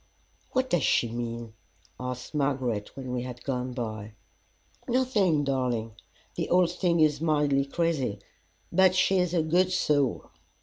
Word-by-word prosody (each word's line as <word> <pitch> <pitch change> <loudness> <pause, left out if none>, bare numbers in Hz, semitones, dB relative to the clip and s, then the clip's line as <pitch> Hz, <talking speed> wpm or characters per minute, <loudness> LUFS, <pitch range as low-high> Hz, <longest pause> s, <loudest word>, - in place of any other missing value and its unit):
"What 260 0 0
does 175 - +3
she 120 - +2
mean?" 115 -1 -5 0.5
asked 125 +2 -6
Margaret, 130 -7 -1
when 130 -2 -5
we 125 -1 -2
had 125 -1 -7
gone 125 -2 -2
by. 110 -4 -5 0.7
"Nothing, 215 - +2
darling. 125 -5 -1 0.4
The - - -3
old 175 -1 +4
thing 175 -1 +1
is 150 -2 +3
mildly 145 -3 +2
crazy, 140 -8 -1 0.5
but 185 +1 +4
she 185 +1 +3
is 180 -2 +1
a 165 - +2
good 180 +4 +2
soul." 145 -7 0
140 Hz, 140 wpm, -27 LUFS, 125-175 Hz, 0.7 s, old